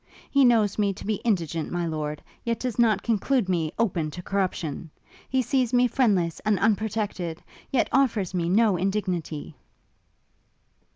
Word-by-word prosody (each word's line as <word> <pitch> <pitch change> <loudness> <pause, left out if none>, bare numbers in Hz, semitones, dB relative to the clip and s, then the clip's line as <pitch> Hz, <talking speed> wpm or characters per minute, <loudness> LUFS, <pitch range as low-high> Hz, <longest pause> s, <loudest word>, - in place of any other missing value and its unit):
He 280 -1 +5
knows 220 -4 +3
me 200 -1 +2
to 195 - -10
be 215 0 0
indigent, 170 -8 -1
my 175 -1 -1
lord, 150 -2 -4 0.2
yet 230 -1 -1
does 250 -2 -3
not 215 -4 +3
conclude 235 0 +1
me 165 -4 0
open 180 -9 0
to 180 +4 -8
corruption! 175 -5 -2 0.4
He 260 0 +1
sees 255 0 0
me 250 0 +5
friendless 200 -10 +1
and 215 -1 +1
unprotected, 205 -4 -1 0.3
yet 255 - +2
offers 225 -9 +1
me 170 -2 0
no 205 0 +3
indignity!' 180 -6 -2
200 Hz, 150 wpm, -25 LUFS, 170-230 Hz, 0.4 s, He